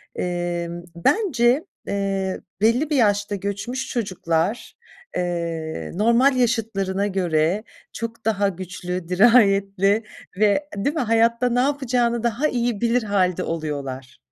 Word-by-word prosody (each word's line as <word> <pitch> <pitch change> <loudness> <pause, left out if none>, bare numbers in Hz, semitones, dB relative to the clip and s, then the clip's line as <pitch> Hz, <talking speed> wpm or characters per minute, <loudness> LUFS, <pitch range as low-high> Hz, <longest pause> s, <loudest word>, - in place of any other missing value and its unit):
emm, 175 -1 -3
bence, 260 - +2 0.2
eee, 195 -1 -2 0.2
belli 245 +8 +3
bir 300 - +1
yaşta 205 -3 +2
göçmüş 205 +7 -4
çocuklar, 185 -2 -2 0.4
eee, 170 -3 -3
normal 235 +6 +4
yaşıtlarına 205 -5 0
göre 180 +1 0 0.3
çok 230 0 -6
daha 205 -2 +2
güçlü, 180 -1 -5
dirayetli 200 0 +4 0.3
ve 215 +8 +2
değil 280 +11 -1
mi, 310 - 0
hayatta 230 +1 +2
ne 245 +1 +1
yapacağını 250 -4 +1
daha 235 +6 +1
iyi 240 -5 -1
bilir 235 +1 +2
hâlde 185 -3 +1
oluyorlar. 140 -6 -5
205 Hz, 115 wpm, -22 LUFS, 180-240 Hz, 0.4 s, normal